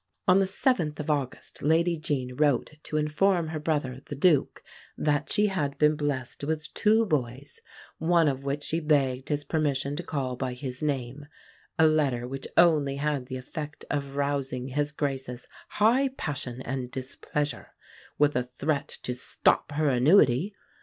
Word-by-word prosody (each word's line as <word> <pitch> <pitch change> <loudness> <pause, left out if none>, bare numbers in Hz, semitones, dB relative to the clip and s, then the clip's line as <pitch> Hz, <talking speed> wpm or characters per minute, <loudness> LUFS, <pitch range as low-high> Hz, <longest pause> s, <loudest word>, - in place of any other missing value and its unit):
On 185 +1 +6
the 195 - +3
7th 185 - 0
of 150 +1 -1
August 140 -4 -3
Lady 165 +3 +3
Jean 140 -6 -3
wrote 145 -2 +2
to 155 - -3
inform 160 +3 +2
her 160 -1 -3
brother, 145 -4 -2
the 145 - -5
Duke, 150 0 +2 0.3
that 145 -1 0
she 210 0 +3
had 155 -9 -1
been 150 0 +4
blessed 145 -4 -3
with 155 +1 -3
"two 220 +1 +3
boys," 140 - -3 0.4
one 165 0 +3
of 135 -1 -1
which 140 +1 -2
she 165 - -1
begged 135 -5 +1
his 145 -1 0
permission 145 -2 -1
to 165 - -3
call 135 -6 -3
by 130 0 -3
his 130 -1 -6
name 140 -1 -3 0.5
a 160 - +6
letter 140 -6 +2
which 135 +1 -6
only 150 -5 +4
had 140 -2 -1
the 130 -1 -4
effect 150 +4 -7
of 140 -1 -3
rousing 140 -2 -1
His 145 +2 -1
Grace's 135 -4 -3 0.2
"high 240 +6 +3
passion 135 - -4
and 130 -1 -4
displeasure," 130 +1 -4 0.4
with 145 0 +3
a 125 - +3
threat 140 +4 -2 0.2
to 125 - -2
stop 125 +3 +1
her 155 +1 +1
annuity. 140 - +4
145 Hz, 160 wpm, -27 LUFS, 130-155 Hz, 0.5 s, On